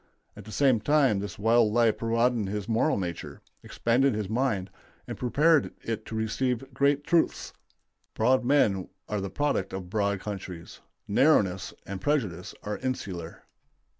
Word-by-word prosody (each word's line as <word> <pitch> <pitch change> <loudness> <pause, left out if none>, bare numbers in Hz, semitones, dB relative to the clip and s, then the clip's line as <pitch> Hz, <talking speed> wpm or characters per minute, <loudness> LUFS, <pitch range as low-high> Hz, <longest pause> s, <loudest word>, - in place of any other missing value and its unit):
At - - -11
the 110 - -10
same 130 -2 +3
time 135 -3 +3
this 100 +1 -6
wild 115 +1 +3
life 115 -1 +2
broadened 115 -2 +1
his 105 0 -4
moral 115 +7 +2
nature, 85 -4 -5 0.2
expanded 125 +2 +1
his 105 -2 -2
mind, 110 -6 0 0.3
and - - -6
prepared 150 +4 +2
it 115 -2 -4
to 115 - -6
receive 125 +4 -2
great 140 +2 +2
truths. 165 +2 +1 0.6
Broad 130 +3 +3
men 110 -8 +2 0.2
are 105 -2 -2
the 100 - -4
product 145 -8 -1
of 90 -2 -6
broad 100 -2 0
countries; 95 -4 -7 0.3
narrowness 100 -6 +2
and 95 -1 -6
prejudice 105 - -1
are 105 0 -4
insular. 95 -10 -5
110 Hz, 145 wpm, -27 LUFS, 100-130 Hz, 0.6 s, same